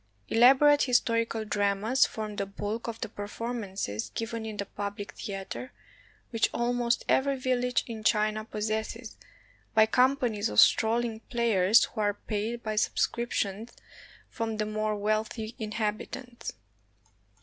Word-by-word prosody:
Elaborate 270 +5 +6
historical 230 -3 +1
dramas 205 +5 +2
form 215 -2 -5
the 200 - -2
bulk 205 +4 -4
of 225 -1 -5
the - - -2
performances 205 - -4
given 225 0 -3
in 215 -1 -6
the 200 - -2
public 205 0 -5
theater, 200 +5 -6 0.6
which 225 -2 +2
almost 240 0 0
every 275 0 +2
village 250 -1 0
in 225 -2 -7
China 215 +1 +2
possesses, 220 +2 -4 0.6
by 220 -1 +7
companies 245 -3 +2
of - - +2
strolling 230 0 +4
players 225 -4 +4
who 220 - -3
are 205 -1 +1
paid 220 +3 -4
by 215 -1 -2
sub 210 - 0
scriptions 225 -2 -1 0.5
from 225 -2 -3
the 215 - 0
more 215 0 -1
wealthy 215 +2 -2
inhabitants. 220 +3 -4
220 Hz, 125 wpm, -28 LUFS, 210-235 Hz, 0.6 s, by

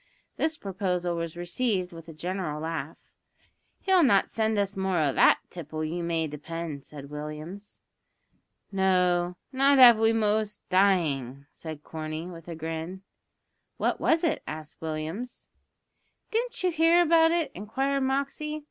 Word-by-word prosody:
This 315 0 -1
proposal 180 -3 -2
was 170 0 -4
received 180 +1 -1
with 165 0 -11
a - - -6
general 175 -1 -3
laugh. 160 -1 -6 0.7
"He'll 380 -2 +4
not 220 -10 +4
send 220 -1 0
us 200 -1 0
more 190 -1 0
o' 145 -4 +2
that - - +5
tipple, 155 -2 -5
you 170 +3 -3
may 165 -1 0
depend," 155 0 -6
said 140 -1 -10
Williams. 155 +7 -7 0.9
"No, 180 -2 +2
not 275 +1 +4
av 240 -4 +9
we 225 0 +4
wos 215 -1 0
dyin'," 150 -9 +2
said 155 -2 -9
Corney, 155 0 -5
with 170 -2 -10
a 170 - -5
grin. 165 +4 -5 0.7
"What - - 0
was 325 +1 +2
it?" 320 -2 +1
asked 155 -1 -8
Williams. 160 +9 -5 0.8
"Didn't 470 -2 -2
you 365 - +3
hear 330 +2 +5
about 325 0 +5
it?" 335 -1 0
inquired 265 +8 -1
Moxey. 280 +3 -1
180 Hz, 140 wpm, -27 LUFS, 160-240 Hz, 0.9 s, av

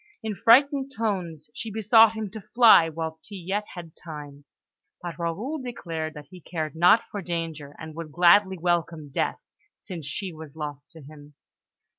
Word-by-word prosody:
In 220 -1 -2
frightened 270 +7 +4
tones 175 -9 -3
she 225 - -5
besought 220 +1 +5
him 220 -3 -5
to 220 +1 -8
fly 225 -9 +7
whilst 160 0 -6
he 205 - -9
yet 195 +3 -3
had 170 -3 -9
time; 145 -3 -10 0.5
but 175 -1 -7
Raoul 210 - -3
declared 165 -10 -5
that 150 -1 -9
he 180 -1 -12
cared 160 -1 -4
not 180 +7 +5
for 205 - -4
danger, 165 -5 -5
and 155 0 -9
would 165 -1 -7
gladly 190 +3 +5
welcome 165 -3 -1
death, - - -1 0.4
since 165 -6 -8
she 185 +5 -4
was 155 -2 -11
lost 145 -2 -7
to 160 -2 -13
him. 145 0 -14
170 Hz, 165 wpm, -25 LUFS, 155-205 Hz, 0.5 s, fly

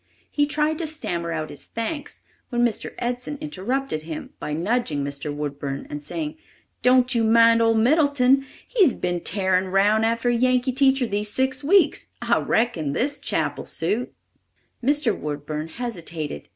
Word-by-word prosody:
He 290 -1 +2
tried 300 +1 0
to 330 - -1
stammer 175 - -2
out 155 -1 -3
his 145 - -6
thanks, 280 +6 -4 0.3
when 240 -1 +2
Mr. 230 -3 -3
Edson 250 +4 -3
interrupted 200 - -2
him 155 0 -7
by 150 - -4
nudging 170 - 0
Mr. 140 +1 -4
Woodburn 145 -1 -4
and 145 - -5
saying: 305 - -4 0.4
"Don't 255 +1 +4
you 230 -2 +2
mind 230 +1 +5
old 225 0 +3
Middleton. 270 +1 +4 0.2
He's 390 - +3
been 175 -1 -1
tarin' 190 0 +1
round 205 +3 +3
after 230 +2 +1
a - - +2
Yankee 255 +1 +2
teacher 265 0 +3
these 205 -1 0
six 265 +4 0
weeks. 345 +1 +3
I - - +2
reckon 175 -12 0
this 285 - -1
chap'll - - -2
suit." 205 +9 -2 0.7
Mr. 280 -3 +2
Woodburn 150 +1 -4
hesitated. 165 - -5
230 Hz, 150 wpm, -23 LUFS, 165-265 Hz, 0.7 s, mind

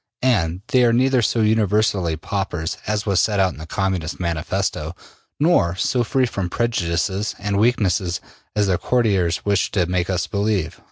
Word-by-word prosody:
And 95 -8 +1
they 130 -1 +4
are 120 -1 +4
neither 130 +1 +3
so 115 +1 +1
universally 105 -5 +2
paupers 85 -2 -3
as 105 0 -1
was 100 -4 +2
set 105 +2 +1
out 95 -1 +2
in - - -13
the 80 - -8
Communist 95 -4 -2
Manifesto, 85 -4 -2 0.4
nor 145 - +3
so 120 +6 +1
free 130 +3 +1
from 100 -6 -3
prejudices 95 -2 -1
and 100 0 -1
weaknesses 95 -6 +1 0.4
as 105 -1 +2
their 95 -3 +1
courtiers 100 -9 +1
wish 100 -2 +1
to 90 -4 +2
make 90 +1 -1
us 90 -2 0
believe.'' 100 -5 -1
100 Hz, 165 wpm, -21 LUFS, 90-110 Hz, 0.4 s, they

